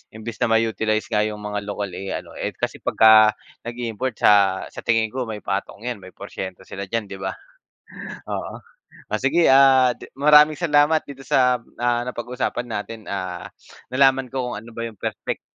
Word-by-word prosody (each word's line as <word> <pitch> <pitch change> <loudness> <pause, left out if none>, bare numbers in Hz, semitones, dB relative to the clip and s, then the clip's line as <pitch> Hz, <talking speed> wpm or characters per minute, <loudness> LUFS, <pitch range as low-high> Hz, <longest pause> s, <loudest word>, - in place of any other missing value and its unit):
imbes 110 +1 -7
na 125 - +2
ma 115 - +3
utilize 110 -1 0
nga 105 - +2
yung 105 0 -2
mga 105 0 -4
local 100 -1 -4
eh, 95 +2 -5
ano - - -7
eh, - - -3
kasi - - -3
pagka 110 -1 +6 0.3
nag-iimport 120 0 -4
sa 100 -2 +4
sa - - -9
tingin 115 -2 +1
ko 130 -2 -3
may 105 -2 -6
patong 100 +2 -4
'yan, 120 -3 -4
may 95 -1 -14
porsyento 95 0 -7
sila 95 +1 -7
diyan 110 -1 -3
'di 95 - -7
ba? 95 0 -4 0.9
Oo - - -5 0.5
o 105 - +1
sige 155 +7 +3
ah, 135 -2 +6 0.2
maraming 150 +2 +6
salamat 155 -1 +3
dito 135 -1 -11
sa 125 -1 +3 0.2
ah, 120 0 +2
napag-usapan 125 0 -3
natin 110 +1 -5
ah, 95 -3 -5 0.4
nalaman 135 0 +3
ko 125 -2 -3
kung - - -4
ano 115 - -13
ba 115 0 -5
yung 115 -2 -8
perpek - - -4
115 Hz, 180 wpm, -22 LUFS, 105-130 Hz, 0.9 s, pagka